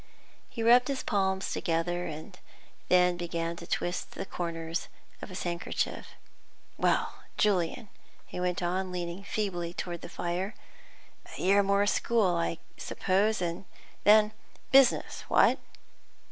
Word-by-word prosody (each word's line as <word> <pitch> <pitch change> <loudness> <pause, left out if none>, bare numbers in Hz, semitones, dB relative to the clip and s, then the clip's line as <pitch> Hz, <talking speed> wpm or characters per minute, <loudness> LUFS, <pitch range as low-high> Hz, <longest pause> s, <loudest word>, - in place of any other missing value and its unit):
He 230 - -4
rubbed 245 +2 +6
his 275 -2 -2
palms 190 -2 0
together, 175 0 -1 0.8
then 180 -1 +4
began 170 -1 -3
to 170 - -9
twist 175 - -2
the 195 - -4
corners 165 -2 -4 0.3
of - - -7
his 185 - -5
handkerchief. 170 -1 -2 0.7
"Well, - - +1 0.2
Julian," 205 +2 +1 0.4
he - - -7
went 180 0 -1
on, 185 +2 -1
leaning 175 +1 -4
feebly 180 -5 -2
forward 175 -1 -4
to - - -24
the - - -8
fire, 180 +4 -3 0.8
"a - - -8
year 200 +2 +4
more 200 +1 +3
school, 205 -3 +2
I 170 0 -1 0.2
suppose, 200 +1 +1
and 170 +2 -3 0.4
then 210 +1 +6 0.4
business; 270 -1 +4
what?" - - +4
180 Hz, 130 wpm, -29 LUFS, 175-205 Hz, 0.8 s, rubbed